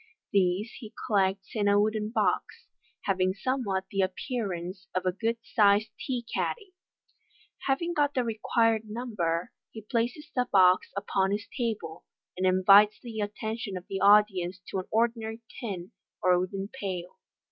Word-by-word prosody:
These 195 +2 +2
he 220 -3 -11
collects 195 -3 +1
in 210 -2 +1
a 205 0 +5
wooden 215 0 0
box, 230 - -1 0.4
having 185 -1 +1
somewhat 210 -4 -1
the 195 - +1
appearance 185 -2 -3
of 185 0 0
a 185 - +3
good 225 +5 -1
sized 205 0 +3
tea 245 -3 -3
caddy. 405 -5 -2 0.9
Having 335 +6 +1
got 290 -2 +1
the 255 - +2
required 225 -1 +1
number, 200 -8 -2 0.2
he 220 - -9
places 245 +7 -2
the 250 -1 +1
box 185 -1 +5
upon 195 -1 0
his 205 +1 -2
table, 210 - -3 0.3
and 185 +1 +1
invites 200 +3 +6
the 230 -3 -7
attention 210 -1 -3
of 180 - -9
the 195 - -3
audience 195 -3 +4
to 190 - -2
an 185 - -5
ordinary 225 0 0 0.2
tin 195 -7 -5 0.3
or 180 -1 +5
wooden 195 +2 -3
pail. 185 -8 -5
205 Hz, 145 wpm, -28 LUFS, 185-230 Hz, 0.9 s, invites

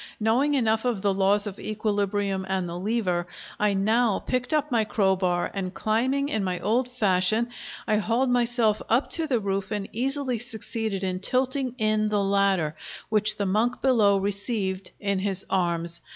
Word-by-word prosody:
Knowing 250 +7 +2
enough 220 -4 +1
of 235 -6 -1
the 200 -1 +2
laws 200 +2 +3
of 200 -2 -6
equilibrium 205 -2 -1
and 190 -2 -1
the 170 - -6
lever, 180 -3 -1 0.3
I 210 -1 +2
now 220 +2 +2
picked 250 -1 -2
up 300 -2 0
my 230 -2 +3
crowbar; 190 -4 0
and 190 -2 -3
climbing 260 +6 0
in 215 -6 -1
my 180 -2 -2
old 240 +4 0
fashion, 215 -1 +1 0.4
I 215 -1 +2
hauled 230 +5 +1
myself 235 -3 +2
up 240 +5 +2
to 325 -1 +4
the 250 -5 +1
roof 195 -1 -2
and 205 -2 -3
easily 260 0 -1
succeeded 220 -3 -3
in 185 -1 -2
tilting 260 +2 0
in 215 -2 +1
the 205 -1 +1
ladder, 195 -5 +1 0.3
which 215 -1 +2
the 200 - -1
monk 220 +6 0
below 220 -7 +3
received 195 -1 -2
in 200 -1 -1
his 195 -1 0
arms. 170 -2 0
210 Hz, 165 wpm, -25 LUFS, 195-240 Hz, 0.4 s, to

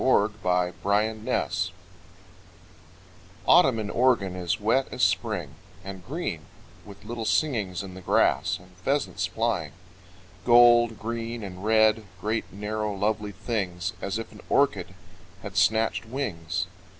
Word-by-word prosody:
[Mary 110 -5 +4 0.5
Carolyn 105 +3 +1
Davies] - - 0 1.8
Autumn - - +6
in 105 -2 -3
Oregon 120 -7 +2
is 90 -1 -1
wet 115 +6 +2
as - - -2
Spring, - - 0 0.3
And 95 -1 -8
green, 125 - -4 0.4
with 100 0 -13
little 115 +1 -4
singings 110 - 0
in 95 -1 -8
the 95 - -10
grass, - - +2
And 90 0 -18
pheasants 100 -5 -1
flying, 90 -6 -1 0.7
Gold, 120 -1 +6
green 115 0 -4
and 95 -1 -8
red, 110 0 +4
Great, 110 +3 -2
narrow, 105 +1 -3
lovely 105 +1 -1
things, 95 -4 -3
As 100 +2 -2
if 115 - -6
an - - -13
orchid 95 -10 +1 0.5
had - - -7
snatched 110 +1 +2
wings. 95 - -3
105 Hz, 125 wpm, -26 LUFS, 95-115 Hz, 1.8 s, Autumn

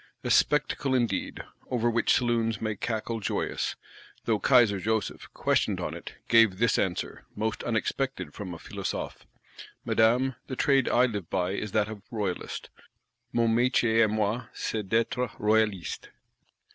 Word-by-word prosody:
A - - -1
spectacle 150 -2 +2
indeed; 120 -3 -1 0.3
over 120 -2 +1
which 115 -1 +2
saloons 115 -3 +1
may 110 -1 -2
cackle 115 +2 -3
joyous; 105 - -2 0.5
though 110 -2 +1
Kaiser 115 -6 +4
Joseph, 110 +2 -2
questioned - - +1
on - - -3
it, - - -9
gave 115 -5 +5
this 115 +3 +2
answer, 90 -4 -3
most 110 +1 -2
unexpected 125 +3 -2
from 100 -4 -6
a 85 - -6
Philosophe: - - -5 0.6
'Madame, 120 +4 +3
the 130 - -4
trade 135 -2 +3
I 125 +1 +4
live 105 -8 -4
by 90 -1 0
is 105 +1 -3
that 105 -1 +2
of 105 -2 -8
royalist 105 -7 -4 0.6
(Mon 115 -1 +2
métier 120 -2 +3
à 110 - +3
moi 110 +3 -1
c'est 105 -4 -3
d'être 115 +3 +1
royaliste). 105 -5 0
115 Hz, 145 wpm, -28 LUFS, 105-120 Hz, 0.6 s, gave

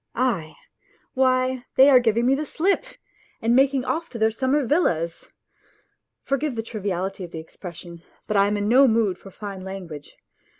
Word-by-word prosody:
Aie! 225 -11 -1 0.6
Why, 255 -1 +1
they 265 - +7
are 255 - +8
giving 235 0 +1
me 260 - +4
the 285 +3 -1
slip 370 +9 0 0.5
and 230 +2 +2
making 270 0 +3
off 330 +1 -2
to 235 - -8
their 220 0 +2
summer 265 +4 0
villas! 170 - 0 0.9
For 275 - 0
give 285 -2 -3
the 225 - -3
triviality 195 -3 -4
of 175 - -7
the 165 - -8
expression, 170 +1 -10 0.2
but 215 - -3
I 200 0 +4
am 205 0 0
in 205 0 -1
no 260 +4 +6
mood 220 -5 +1
for 195 - -12
fine 195 0 -8
language 180 -6 -9
225 Hz, 175 wpm, -23 LUFS, 190-260 Hz, 0.9 s, are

